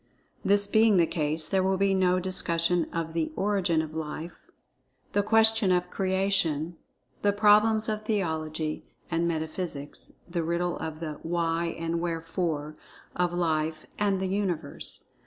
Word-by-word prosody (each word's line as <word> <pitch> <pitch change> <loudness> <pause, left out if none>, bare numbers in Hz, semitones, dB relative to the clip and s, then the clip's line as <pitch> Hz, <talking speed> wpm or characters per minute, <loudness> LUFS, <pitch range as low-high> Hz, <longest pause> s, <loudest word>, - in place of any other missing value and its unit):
This 205 0 +3
being 220 0 +4
the 170 - +5
case, 155 -1 0
there 190 -1 +2
will 190 0 +1
be 195 0 +2
no 185 -1 +3
discussion 175 -2 0
of 165 -1 -3
the 165 -1 -1
"origin 190 -5 +1
of 155 0 -8
Life"—the 160 +5 -6
question 220 -1 +4
of 180 0 +1
"creation"—the 190 -1 -1
problems 215 +1 +4
of 215 -1 -1
theology 160 -7 -2 0.3
and 170 0 +1
metaphysics—the 160 +1 -4
riddle 170 +1 -1
of 160 0 -5
the 155 -3 -5
"Why 170 0 0
and 165 0 -2
Wherefore" 165 -2 -2 0.4
of 180 -1 +1
Life 160 -2 -1
and 200 -2 +2
the 190 - -1
Universe. 185 -6 -3
175 Hz, 130 wpm, -28 LUFS, 160-195 Hz, 0.4 s, the